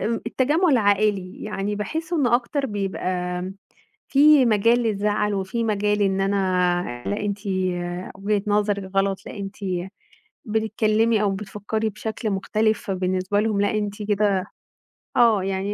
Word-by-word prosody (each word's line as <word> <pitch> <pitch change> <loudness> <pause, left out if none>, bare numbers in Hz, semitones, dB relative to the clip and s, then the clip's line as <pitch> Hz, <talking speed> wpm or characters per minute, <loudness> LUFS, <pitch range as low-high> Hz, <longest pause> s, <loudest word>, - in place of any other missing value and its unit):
التجمُع 260 - +1
العائلي، 205 -5 +1
يعني 205 -1 -3
باحس 320 +11 -4
إنه 245 -7 +3
أكتر 270 +3 0
بيبقى 200 -3 -3 0.4
آمم 190 +2 -6 0.5
في 285 -2 +6
مجال 230 +2 +4
للزعل 210 -1 0
وفي 195 +5 -2
مجال 210 -1 +1
إن 195 -1 +1
أنا، 180 -8 0
لأ 205 - -1
أنتِ 205 -1 -2 0.8
وجهة 200 +1 -1
نظركِ 205 -2 0
غلط، 195 0 +2
لأ - - -8
أنتِ 195 0 -6 0.9
بتتكلمي 220 0 +1
أو 205 - +2
بتفكري 210 +2 -3
بشكل 215 +1 -4
مُختلف، 215 +3 0
فبالنسبة 185 0 0
لهُم، 215 -2 0
لأ 205 - +2
أنتِ 210 0 -3
كده 200 -2 +1 0.7
آه 225 -5 +5
يعني 195 +1 -2
205 Hz, 130 wpm, -23 LUFS, 195-220 Hz, 0.9 s, في